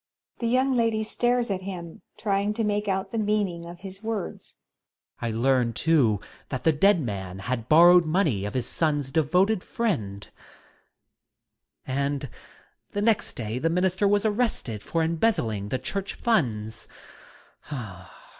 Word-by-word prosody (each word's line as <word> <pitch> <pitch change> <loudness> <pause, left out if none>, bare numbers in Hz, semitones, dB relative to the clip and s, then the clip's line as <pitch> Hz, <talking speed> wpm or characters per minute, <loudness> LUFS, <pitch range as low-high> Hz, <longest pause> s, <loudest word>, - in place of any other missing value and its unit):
The 235 - -1
YoxTNG 260 +1 +2
Lady 225 -2 +1
stares 240 +1 +1
at 190 -1 -2
him^ 180 -4 -7 0.2
trying 205 0 0
to 225 - -1
make 210 0 0
out 190 -1 -1
the 230 - -1
meaning 205 -5 -1
of 175 0 -10
his 190 0 -9
words. 220 -4 -5 0.6
Student. 115 -2 -3
I - - -2
learned, 125 -2 +2
too, 135 -11 +3 0.3
that 130 -3 -4
the 160 - +5
dead 180 +5 +4
man 95 - -4
had 115 +3 -4
bor 170 +3 +8
rowed 175 -1 +6
money 155 - +1
of 105 - -5
his 125 -3 0
son's 145 -3 0
devoted 180 +7 +2
friend.... 105 - -2
{PaiLse\ - - -29 1.5
And 140 +1 -2 0.6
the 205 - -1
next 220 -1 +1
day 115 +1 -3
the 165 - +1
minister 185 +3 +2
was 205 +1 +2
arrested 210 - 0
for 165 +7 -1
embezzling 155 - 0
the 130 - 0
church 195 +9 -4
funds. 115 - -1
170 Hz, 150 wpm, -26 LUFS, 130-205 Hz, 1.5 s, bor